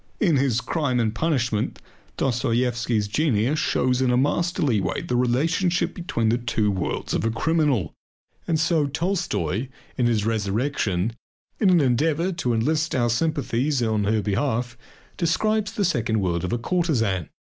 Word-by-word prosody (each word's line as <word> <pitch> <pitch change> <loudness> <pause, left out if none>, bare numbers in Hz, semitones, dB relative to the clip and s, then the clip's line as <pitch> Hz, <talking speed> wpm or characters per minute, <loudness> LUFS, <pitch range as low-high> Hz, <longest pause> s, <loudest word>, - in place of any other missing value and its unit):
In 170 -9 +3
his 130 -3 +1
"Crime 140 -6 -1
and 110 -2 0
Punishment" 120 -6 -1 0.4
Dostoyevsky's 120 -3 0
genius 135 +2 +1
shows 125 0 +1
in 130 - +2
a 125 - +3
masterly 145 - +1
way - - -2
the 125 - -2
relationship 160 +9 +1
between 120 -11 -1
the 120 +2 +1
two 115 -3 0
worlds 95 -3 -3
of - - 0
a 115 - +1
criminal. 135 - 0 0.5
And 160 -2 +1
so, 160 -1 +2
too, 140 - -5
Tolstoy, 135 - -1 0.3
in 120 - +3
his 110 -3 +1
"Resurrection," 110 -2 -1 0.5
in 200 - +4
an 175 -3 +5
endeavour 150 +7 +1
to 130 -8 -2
enlist 155 +8 0
our 120 -2 +2
sympathies 140 0 0
in 110 -3 0
her 105 0 +1
behalf, 120 +3 -1 0.4
describes 210 +5 0
the 210 -3 0
second 115 -9 0
world 85 -3 -1
of 90 - -2
a 120 - +1
courtesan. 115 - 0
125 Hz, 155 wpm, -24 LUFS, 110-160 Hz, 0.5 s, an